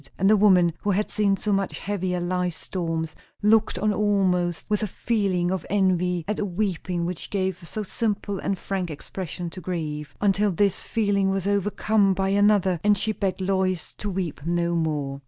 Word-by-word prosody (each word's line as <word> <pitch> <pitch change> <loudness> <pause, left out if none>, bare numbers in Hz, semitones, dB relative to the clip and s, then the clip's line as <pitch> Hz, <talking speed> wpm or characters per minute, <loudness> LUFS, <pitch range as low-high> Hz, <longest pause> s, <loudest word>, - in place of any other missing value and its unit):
And 195 - +2
the 215 - +6
woman 185 -5 +5
who 205 - -1
had 205 +2 0
seen 205 -2 +2
so 210 +1 -1
much 195 -1 -1
heavier 185 -2 -2
life 180 -1 -1
storms, 165 -3 -3 0.3
looked 220 -1 +4
on 210 +3 +1
almost 185 -5 +1
with 210 -1 0
a 215 - 0
feeling 195 -5 0
of 190 -3 -2
envy 180 -3 +1
at 210 - -1
the 210 - -1
weeping 180 -2 -2
which 175 -1 -5
gave 190 -2 -1
so 215 - -3
simple 205 -2 -2
and 195 - -1
frank 185 -1 -3
expression 170 +2 -6
to 185 - -9
grief. 155 -4 -4
Until 205 +1 +2
this 195 +1 +1
feeling 205 -3 +1
was 195 -1 -1
overcome 200 0 +2
by 190 +1 0
another, 200 -3 +3
and 205 0 +4
she 220 +3 0
begged 195 -3 -2
Lois 185 -2 0
to 210 - -3
weep 180 -7 -3
no 170 +1 0
more. 150 -4 -1
190 Hz, 180 wpm, -25 LUFS, 175-205 Hz, 0.3 s, the